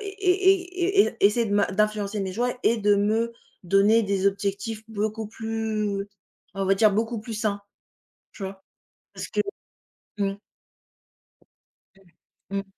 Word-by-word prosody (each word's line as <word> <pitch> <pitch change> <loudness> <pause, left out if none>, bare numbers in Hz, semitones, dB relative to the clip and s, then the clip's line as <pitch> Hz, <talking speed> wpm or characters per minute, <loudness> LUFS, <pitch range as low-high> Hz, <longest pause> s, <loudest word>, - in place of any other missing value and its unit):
é 380 -1 +2
é - - +1
é - - -18
essayer 220 +3 +4
de 200 - -3
m'in 205 - +3
d'influencer 210 0 0
mes 190 -1 -3
choix 245 +5 0
et 230 - +3
de 205 -1 +3
me 220 +3 +1 0.3
donner 200 +5 +4
des 200 -2 0
objectifs 200 +2 -1
beaucoup 215 0 -3
plus 215 -2 -2 0.5
on 195 - -1
va 195 - +4
dire, 215 +2 +5
beaucoup 225 +2 -1
plus 225 +1 -7
sains, 210 -1 -1 0.7
tu - - -13
vois? 190 0 -7 0.5
Parce - - -6
que - - +1 0.8
mmh. 195 -1 0 2.2
Mmh. 195 0 -2
215 Hz, 135 wpm, -25 LUFS, 200-230 Hz, 2.2 s, dire